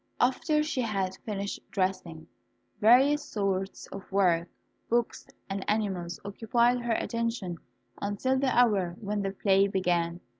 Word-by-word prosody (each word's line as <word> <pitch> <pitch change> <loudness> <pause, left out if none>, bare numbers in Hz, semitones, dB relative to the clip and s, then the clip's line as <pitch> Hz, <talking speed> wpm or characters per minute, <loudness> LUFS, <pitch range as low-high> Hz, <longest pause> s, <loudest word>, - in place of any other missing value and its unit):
After 300 +4 +2
she 290 -4 -1
had 195 -5 -2
finished 200 -2 -3
dressing, 185 -4 -2 0.5
various 270 +7 +5
sorts 195 -6 -2
of 195 0 -9
work, 180 -4 +2 0.4
books, 235 0 0 0.2
and 195 0 -3
animals 190 -5 -1
occupied 235 +4 +1
her 240 -1 0
attention 230 -7 -2 0.4
until 205 +6 0
the 275 - +1
hour 205 -9 +3
when 205 -1 -2
the 195 - -1
play 195 0 +3
began. 175 -3 0
200 Hz, 125 wpm, -28 LUFS, 190-235 Hz, 0.5 s, various